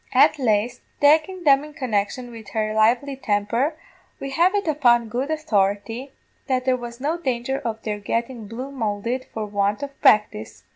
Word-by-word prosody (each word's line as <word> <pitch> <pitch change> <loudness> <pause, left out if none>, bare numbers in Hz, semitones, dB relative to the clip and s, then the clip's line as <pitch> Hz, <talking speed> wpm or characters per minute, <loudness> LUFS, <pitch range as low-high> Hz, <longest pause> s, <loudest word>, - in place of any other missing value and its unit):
At 300 - +5
laist, 235 0 +1 0.2
takin' 320 +5 +3
them 280 -2 +5
in 300 0 -11
connection 240 0 -2
wid 225 -2 -11
her 215 -1 0
lively 235 +6 +2
temper, 230 +5 0 0.4
we 275 - -5
have 345 +7 +3
it 400 -4 -1
upon 240 -7 +3
good 250 +6 -2
authority, 225 -3 -1 0.4
that 255 -2 0
there 260 -1 +3
was 240 -1 -8
no 310 +6 -1
danger 260 -2 -2
of 225 -1 -5
their 210 -1 -3
getting 230 +1 -3
blue 250 +6 -6
moulded 235 0 -2
for 220 -1 -4
want 205 +2 -1
of 280 -1 -8
practice. 210 - +2
240 Hz, 165 wpm, -23 LUFS, 215-275 Hz, 0.4 s, At